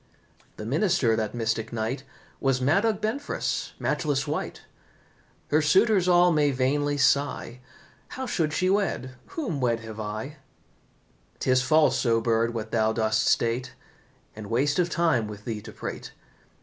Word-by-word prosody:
The 105 Hz, -, -6 dB
minister 140 Hz, -, +2 dB
that 110 Hz, 0 st, -2 dB
mystic 115 Hz, -1 st, -2 dB
night 115 Hz, +3 st, -3 dB, 0.4 s
Was 135 Hz, -2 st, +1 dB
Madog 195 Hz, -, +2 dB
Benfras, 275 Hz, +7 st, -2 dB
matchless 145 Hz, -4 st, -1 dB
wight. 150 Hz, +2 st, -4 dB, 0.9 s
Her 155 Hz, +2 st, +4 dB
suitors 190 Hz, +4 st, +3 dB
all 175 Hz, 0 st, +5 dB
may 150 Hz, -2 st, +3 dB
vainly 145 Hz, +2 st, 0 dB
sigh, 140 Hz, -3 st, +1 dB, 0.5 s
How 260 Hz, -, -6 dB
should 160 Hz, -10 st, 0 dB
she 185 Hz, +5 st, 0 dB
wed, 195 Hz, -9 st, 0 dB, 0.2 s
whom 215 Hz, -, -4 dB
wed 115 Hz, -2 st, +1 dB
have 110 Hz, -1 st, -9 dB
I? 110 Hz, +8 st, -5 dB, 1.0 s
'Tis 130 Hz, -1 st, +2 dB
false, 155 Hz, +3 st, +3 dB
O 115 Hz, -1 st, +3 dB
Bird, 115 Hz, 0 st, +1 dB
what 110 Hz, -2 st, -5 dB
thou 110 Hz, -1 st, +2 dB
dost 110 Hz, -1 st, +1 dB
state, 120 Hz, +2 st, 0 dB, 0.6 s
And 110 Hz, -1 st, -8 dB
waste 140 Hz, +7 st, +1 dB
of 175 Hz, -1 st, +2 dB
time 160 Hz, -11 st, +1 dB
with 105 Hz, 0 st, -9 dB
thee 110 Hz, -3 st, -4 dB
to -, -, -10 dB
prate. -, -, -7 dB
135 Hz, 145 wpm, -26 LUFS, 115-160 Hz, 1.0 s, all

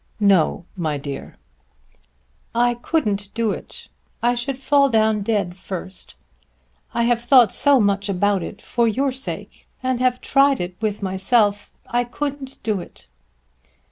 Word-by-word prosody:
"No, 190 Hz, -4 st, +3 dB
my 160 Hz, -5 st, -2 dB
dear." 140 Hz, -1 st, -7 dB, 1.2 s
"I 240 Hz, +1 st, +3 dB
couldn't 210 Hz, -6 st, -1 dB
do 230 Hz, -2 st, +1 dB
it. -, -, -8 dB, 0.4 s
I 240 Hz, +1 st, +4 dB
should 250 Hz, +2 st, -3 dB
fall 280 Hz, +1 st, +3 dB
down 220 Hz, -2 st, +2 dB
dead 200 Hz, -4 st, -1 dB
first. 185 Hz, 0 st, -8 dB, 0.8 s
I 235 Hz, -, 0 dB
have 235 Hz, 0 st, +2 dB
thought 240 Hz, -3 st, +6 dB
so 285 Hz, -2 st, +4 dB
much 200 Hz, -1 st, +1 dB
about 200 Hz, 0 st, +1 dB
it, 195 Hz, -, -8 dB
for 235 Hz, -1 st, +1 dB
your 265 Hz, +5 st, +1 dB
sake; 265 Hz, +1 st, -7 dB, 0.2 s
and 255 Hz, -1 st, 0 dB
have 250 Hz, 0 st, +2 dB
tried 275 Hz, -1 st, +3 dB
it 180 Hz, 0 st, -4 dB
with 210 Hz, -2 st, -2 dB
myself. 200 Hz, +2 st, +1 dB
I 240 Hz, +1 st, 0 dB
couldn't 275 Hz, +2 st, -5 dB
do 215 Hz, -3 st, 0 dB
it." -, -, -14 dB
225 Hz, 140 wpm, -21 LUFS, 200-255 Hz, 1.2 s, thought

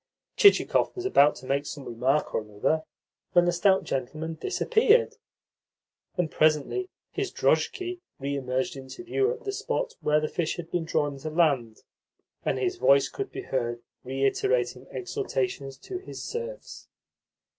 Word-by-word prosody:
Chichikov 405 Hz, +1 st, +5 dB
was 365 Hz, 0 st, -5 dB
about 150 Hz, -, +5 dB
to 130 Hz, -, -11 dB
make 140 Hz, +2 st, 0 dB
some 140 Hz, -3 st, -7 dB
remark 130 Hz, +5 st, 0 dB
or -, -, +1 dB
another 105 Hz, +9 st, 0 dB, 0.5 s
when 175 Hz, -1 st, +6 dB
the 175 Hz, -, +3 dB
stout 190 Hz, +2 st, +3 dB
gentleman 155 Hz, +5 st, -3 dB
disappeared; 440 Hz, -, +2 dB, 1.0 s
and 170 Hz, -3 st, 0 dB
presently 155 Hz, -, +2 dB, 0.2 s
his -, -, -2 dB
drozhki 365 Hz, -1 st, 0 dB, 0.2 s
re 140 Hz, +1 st, -2 dB
emerged 130 Hz, -1 st, -1 dB
into 135 Hz, -, -9 dB
view 405 Hz, +4 st, +1 dB
at 480 Hz, -1 st, -6 dB
the 400 Hz, -, -2 dB
spot 475 Hz, +4 st, -2 dB
where 150 Hz, 0 st, +3 dB
the 155 Hz, -, -1 dB
fish 165 Hz, -1 st, -1 dB
had 170 Hz, -1 st, -8 dB
been 175 Hz, -2 st, -1 dB
drawn 145 Hz, -3 st, -1 dB
to 155 Hz, -, -4 dB
land, 140 Hz, -9 st, +1 dB, 0.6 s
and -, -, 0 dB
his 370 Hz, -1 st, -1 dB
voice 140 Hz, -, +5 dB
could 405 Hz, -1 st, -5 dB
be 390 Hz, -, -6 dB
heard 120 Hz, -2 st, -2 dB, 0.2 s
reiterating 130 Hz, -2 st, 0 dB
exhortations 130 Hz, +1 st, -3 dB
to 370 Hz, -1 st, -6 dB
his 380 Hz, -, -8 dB
serfs. 475 Hz, +2 st, -6 dB
155 Hz, 150 wpm, -27 LUFS, -, 1.0 s, when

